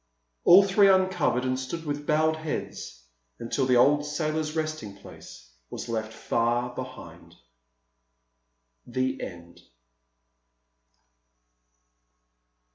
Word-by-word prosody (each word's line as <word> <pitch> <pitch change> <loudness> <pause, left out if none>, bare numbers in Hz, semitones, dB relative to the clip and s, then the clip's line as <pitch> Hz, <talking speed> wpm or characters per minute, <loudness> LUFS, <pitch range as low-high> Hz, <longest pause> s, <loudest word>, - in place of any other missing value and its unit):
All 185 +3 +9
three 195 +1 +4
uncovered 185 -9 +2
and 130 0 -1
stood 160 +6 -6
with 145 0 -4
bowed 155 +1 +2
heads 155 - -6 0.3
until 115 +2 -2
the 125 - +3
old 145 +4 +4
sailor's 155 +1 -2
resting 155 -10 -4
place - - -14 0.2
was - - -7
left 110 -1 -3
far 120 +2 -1
behind. 130 -1 -10 1.5
THE 130 +1 -2
END. 85 -1 -9
135 Hz, 95 wpm, -26 LUFS, 120-155 Hz, 1.5 s, All